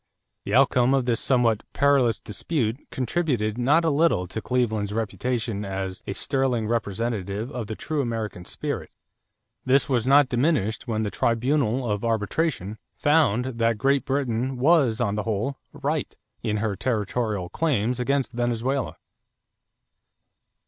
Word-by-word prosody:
The 100 Hz, -, 0 dB
outcome 125 Hz, 0 st, +4 dB
of 130 Hz, -2 st, +1 dB
this 120 Hz, -2 st, +1 dB
somewhat 120 Hz, -5 st, +2 dB
perilous 135 Hz, -5 st, +3 dB
dispute 120 Hz, -, -3 dB
contributed 125 Hz, -5 st, -1 dB
not 150 Hz, +7 st, +3 dB
a 160 Hz, -, +3 dB
little 145 Hz, -, +2 dB
to 100 Hz, +4 st, -4 dB
Cleveland's 110 Hz, -5 st, 0 dB
reputation 115 Hz, -1 st, -2 dB
as 95 Hz, -2 st, -4 dB
"a -, -, -2 dB
sterling 130 Hz, -2 st, 0 dB
representative 110 Hz, 0 st, -2 dB
of 120 Hz, -6 st, -4 dB
the 110 Hz, -, -4 dB
true 155 Hz, +4 st, -2 dB
American 110 Hz, -7 st, -3 dB
spirit." -, -, -4 dB, 0.7 s
This 135 Hz, +2 st, +3 dB
was 125 Hz, -3 st, 0 dB
not 140 Hz, 0 st, +6 dB
diminished 125 Hz, -, 0 dB
when 110 Hz, -2 st, -1 dB
the 105 Hz, -, -2 dB
tribunal 125 Hz, +1 st, +1 dB
of 105 Hz, -1 st, -1 dB
arbitration 110 Hz, -, -1 dB, 0.2 s
found 145 Hz, -6 st, +3 dB
that 115 Hz, -3 st, 0 dB
Great 135 Hz, +3 st, +2 dB
Britain 130 Hz, -2 st, -1 dB
was 130 Hz, -4 st, +3 dB
on 105 Hz, -4 st, +1 dB
the 105 Hz, -, -1 dB
whole 115 Hz, +6 st, -2 dB
right 145 Hz, +1 st, -3 dB, 0.3 s
in 105 Hz, -2 st, -1 dB
her 105 Hz, -1 st, -1 dB
territorial 105 Hz, -4 st, -1 dB
claims 125 Hz, -, 0 dB
against 135 Hz, +1 st, 0 dB
Venezuela. 120 Hz, -, -1 dB
120 Hz, 135 wpm, -25 LUFS, 110-135 Hz, 0.7 s, not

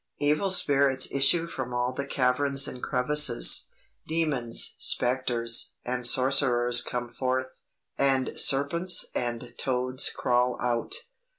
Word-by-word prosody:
Evil 150 Hz, +7 st, 0 dB
spirits 140 Hz, -7 st, +2 dB
issue 140 Hz, +5 st, +1 dB
from 130 Hz, -7 st, -6 dB
all 125 Hz, +1 st, -2 dB
the 140 Hz, +2 st, -5 dB
caverns 135 Hz, +1 st, +1 dB
and 125 Hz, -, -8 dB
crevasses 130 Hz, -, +3 dB, 0.4 s
demons, 150 Hz, -8 st, -1 dB
spectres, 120 Hz, -2 st, -1 dB
and 125 Hz, -1 st, +1 dB
sorcerers 125 Hz, -2 st, +3 dB
come 120 Hz, 0 st, -5 dB
forth, 130 Hz, +1 st, -4 dB, 0.4 s
and 135 Hz, -2 st, +1 dB
serpents 170 Hz, +6 st, +2 dB
and 120 Hz, 0 st, -5 dB
toads 130 Hz, 0 st, +1 dB
crawl 125 Hz, 0 st, -1 dB
out. 120 Hz, -1 st, -2 dB
130 Hz, 110 wpm, -26 LUFS, 125-140 Hz, 0.4 s, crevasses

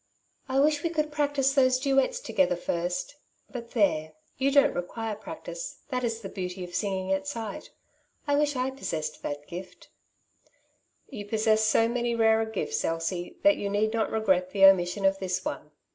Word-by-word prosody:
^^I 270 Hz, +2 st, +3 dB
wish 300 Hz, -1 st, +2 dB
we 335 Hz, -, 0 dB
could 305 Hz, -2 st, -1 dB
practise 285 Hz, -2 st, +1 dB
those 255 Hz, -2 st, +4 dB
duets 275 Hz, -, +2 dB
together 280 Hz, -, +1 dB
first; 175 Hz, +10 st, -3 dB, 0.3 s
but 235 Hz, -2 st, -8 dB
there, 155 Hz, -9 st, +1 dB, 0.2 s
you 270 Hz, +1 st, +1 dB
don't 280 Hz, 0 st, +4 dB
require 220 Hz, +5 st, -4 dB
practice, -, -, -8 dB
that 250 Hz, -2 st, -2 dB
is 230 Hz, -1 st, -2 dB
the 200 Hz, -, -6 dB
beauty 185 Hz, -1 st, -5 dB
of 175 Hz, 0 st, -9 dB
singing 190 Hz, 0 st, -1 dB
at 190 Hz, 0 st, -2 dB
sight. 220 Hz, -2 st, -5 dB, 0.6 s
I 285 Hz, -1 st, +2 dB
wish 290 Hz, 0 st, +1 dB
I 255 Hz, +1 st, -1 dB
possessed 165 Hz, -, -4 dB
that 145 Hz, 0 st, -5 dB
gift/' 180 Hz, +2 st, -9 dB, 1.2 s
'^Tou 205 Hz, -4 st, -7 dB
possess 220 Hz, 0 st, +3 dB
so 225 Hz, +1 st, +4 dB
many 240 Hz, 0 st, -1 dB
rarer 225 Hz, -1 st, +3 dB
gifts, 220 Hz, -2 st, -2 dB
Elsie, 165 Hz, +2 st, -3 dB
that 300 Hz, 0 st, +5 dB
you 200 Hz, -, -3 dB
need 215 Hz, +2 st, +1 dB
not 225 Hz, -1 st, 0 dB
regret 190 Hz, -5 st, +1 dB
the 195 Hz, 0 st, +5 dB
omission 190 Hz, 0 st, +4 dB
of 195 Hz, 0 st, +3 dB
this 185 Hz, -1 st, -2 dB
one. 150 Hz, -, -4 dB
220 Hz, 175 wpm, -27 LUFS, 185-270 Hz, 1.2 s, that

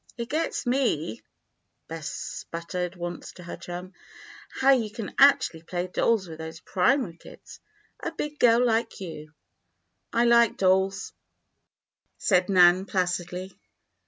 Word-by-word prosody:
"It 235 Hz, 0 st, -5 dB
gets 320 Hz, +2 st, -2 dB
me," 240 Hz, -, 0 dB, 0.7 s
Bess 160 Hz, -2 st, -6 dB
sputtered 180 Hz, +2 st, -5 dB
once 175 Hz, -1 st, -6 dB
to 180 Hz, -, -12 dB
her 175 Hz, -, -7 dB
chum, 180 Hz, +2 st, -8 dB, 0.7 s
"how 270 Hz, +1 st, +5 dB
you 235 Hz, -5 st, +2 dB
can 220 Hz, -1 st, -7 dB
actually 275 Hz, -, +5 dB
play 175 Hz, +2 st, -3 dB
dolls 195 Hz, +2 st, +1 dB
with 160 Hz, -1 st, -9 dB
those 160 Hz, 0 st, -7 dB
primary 190 Hz, -, +1 dB
kids -, -, -14 dB, 0.4 s
a -, -, -4 dB
big 300 Hz, -2 st, -5 dB
girl 240 Hz, 0 st, +5 dB
like 230 Hz, -1 st, 0 dB
you." 155 Hz, -5 st, -8 dB, 0.8 s
"I 235 Hz, +1 st, +2 dB
like 235 Hz, -2 st, +4 dB
dolls," 190 Hz, +1 st, +1 dB, 1.0 s
said 180 Hz, -2 st, +2 dB
Nan, 180 Hz, 0 st, +6 dB
placidly. 180 Hz, 0 st, -3 dB
185 Hz, 130 wpm, -26 LUFS, 175-235 Hz, 1.0 s, Nan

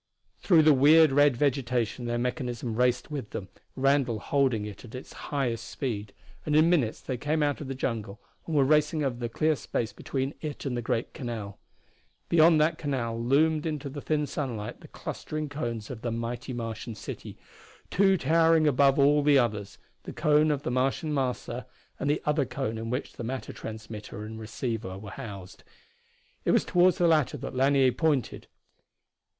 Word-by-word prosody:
Through 165 Hz, -5 st, +5 dB
the 155 Hz, -1 st, +7 dB
weird 150 Hz, +3 st, +6 dB
red 145 Hz, -2 st, +4 dB
vegetation 125 Hz, -4 st, 0 dB
their 120 Hz, 0 st, -1 dB
mechanism 120 Hz, -2 st, -3 dB
raced 125 Hz, +4 st, +1 dB
with 135 Hz, -8 st, -4 dB
them, 95 Hz, -, -6 dB, 0.3 s
Randall 135 Hz, -3 st, +2 dB
holding 125 Hz, -2 st, +1 dB
it 105 Hz, -2 st, -9 dB
at 120 Hz, 0 st, -10 dB
its 130 Hz, -, -9 dB, 0.2 s
highest 130 Hz, -5 st, -2 dB
speed, 105 Hz, -6 st, -4 dB, 0.3 s
and 150 Hz, -, 0 dB
in 160 Hz, +3 st, +5 dB
minutes 130 Hz, -11 st, +1 dB
they 130 Hz, -, -4 dB
came 150 Hz, +4 st, 0 dB
out 145 Hz, 0 st, 0 dB
of 145 Hz, -, -6 dB
the 135 Hz, -, -4 dB
jungle 110 Hz, -5 st, -3 dB, 0.3 s
and 165 Hz, -, -2 dB
were 140 Hz, -, +5 dB
racing 150 Hz, +1 st, +2 dB
over 130 Hz, -4 st, -1 dB
the 120 Hz, -1 st, -3 dB
clear 155 Hz, +6 st, +1 dB
space 115 Hz, -2 st, -3 dB
between 135 Hz, +1 st, -3 dB
it 150 Hz, -2 st, -5 dB
and 130 Hz, -3 st, -1 dB
the 120 Hz, -, -2 dB
great 115 Hz, 0 st, -2 dB
canal. 110 Hz, -6 st, -6 dB, 0.7 s
Beyond 165 Hz, -1 st, +6 dB
that 155 Hz, +2 st, +2 dB
canal 120 Hz, -6 st, -2 dB
loomed 155 Hz, +5 st, +2 dB
into 150 Hz, -3 st, -3 dB
the 145 Hz, +1 st, -7 dB
thin 150 Hz, 0 st, 0 dB
sunlight 125 Hz, -7 st, -4 dB
the -, -, -12 dB
clustering 155 Hz, -1 st, -5 dB
cones 120 Hz, -6 st, -4 dB
of 115 Hz, -3 st, -7 dB
the 120 Hz, -, -2 dB
mighty 115 Hz, +2 st, -4 dB
Martian 115 Hz, -1 st, -5 dB
city, -, -, -8 dB, 0.5 s
two 195 Hz, 0 st, +4 dB
towering 165 Hz, +1 st, +4 dB
above 140 Hz, -1 st, +4 dB
all 145 Hz, +1 st, +5 dB
the 145 Hz, -1 st, +5 dB
others 105 Hz, -5 st, -1 dB, 0.2 s
the -, -, -8 dB
cone 150 Hz, +1 st, +3 dB
of 145 Hz, -2 st, -1 dB
the -, -, -2 dB
Martian 135 Hz, +5 st, 0 dB
Master 125 Hz, -2 st, -2 dB, 0.3 s
and 140 Hz, -, -1 dB
the 150 Hz, -, 0 dB
other 150 Hz, -1 st, +2 dB
cone 115 Hz, -4 st, -3 dB
in 115 Hz, 0 st, -5 dB
which 125 Hz, +4 st, -2 dB
was -, -, -23 dB
the -, -, -5 dB
matter 125 Hz, 0 st, -4 dB
transmitter 110 Hz, -1 st, -8 dB
and 110 Hz, +1 st, -7 dB
receiver. 110 Hz, -3 st, -4 dB, 1.4 s
It -, -, -1 dB
was -, -, +3 dB
toward 180 Hz, -1 st, +4 dB
the 175 Hz, -, +2 dB
latter 155 Hz, -3 st, +2 dB
that 135 Hz, -, -6 dB
Lanier 135 Hz, 0 st, +4 dB
pointed. 150 Hz, -3 st, -1 dB
135 Hz, 180 wpm, -28 LUFS, 115-150 Hz, 1.4 s, the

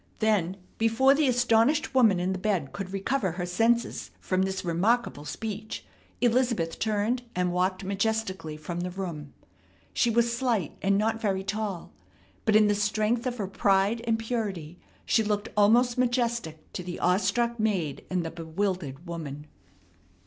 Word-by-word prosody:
Then 195 Hz, -5 st, +1 dB, 0.2 s
before 225 Hz, +5 st, +4 dB
the 295 Hz, 0 st, +2 dB
astonished 245 Hz, +4 st, +3 dB
woman 225 Hz, -8 st, +5 dB
in 180 Hz, +2 st, 0 dB
the 190 Hz, -, -4 dB
bed 185 Hz, -8 st, -1 dB
could 195 Hz, -2 st, -5 dB
recover 195 Hz, -1 st, -1 dB
her 175 Hz, 0 st, -3 dB
senses 225 Hz, +7 st, +1 dB
from 185 Hz, 0 st, 0 dB
this 190 Hz, 0 st, -2 dB
remarkable 175 Hz, -2 st, +1 dB
speech 215 Hz, +4 st, -5 dB, 0.4 s
Elizabeth 235 Hz, -9 st, +1 dB
turned 220 Hz, +3 st, 0 dB
and 180 Hz, 0 st, +1 dB
walked 185 Hz, +2 st, 0 dB
majestically 195 Hz, -5 st, -2 dB
from 170 Hz, +3 st, -5 dB
the 180 Hz, +1 st, -2 dB
room. 170 Hz, -6 st, -6 dB, 0.6 s
She 240 Hz, -, +2 dB
was 235 Hz, +1 st, +2 dB
slight 235 Hz, -, 0 dB
and 195 Hz, 0 st, +3 dB
not 225 Hz, +2 st, 0 dB
very 195 Hz, -3 st, 0 dB
tall, 200 Hz, -3 st, -4 dB, 0.5 s
but 215 Hz, -, +3 dB
in 215 Hz, 0 st, +7 dB
the 205 Hz, -, +3 dB
strength 215 Hz, +4 st, 0 dB
of 245 Hz, -1 st, -3 dB
her 200 Hz, -4 st, -2 dB
pride 195 Hz, +3 st, +2 dB
and 225 Hz, -1 st, +2 dB
purity 205 Hz, -8 st, -4 dB, 0.3 s
she 225 Hz, -, +3 dB
looked 205 Hz, -1 st, -1 dB
almost 235 Hz, +4 st, +4 dB
majestic 235 Hz, -10 st, -1 dB
to -, -, -4 dB
the 175 Hz, 0 st, -6 dB
awestruck 235 Hz, +6 st, +1 dB
maid 185 Hz, -10 st, -1 dB
and 180 Hz, -2 st, -1 dB
the 165 Hz, -, -4 dB
bewildered 165 Hz, -3 st, -3 dB
woman. 150 Hz, -4 st, -6 dB
205 Hz, 155 wpm, -27 LUFS, 180-230 Hz, 0.6 s, in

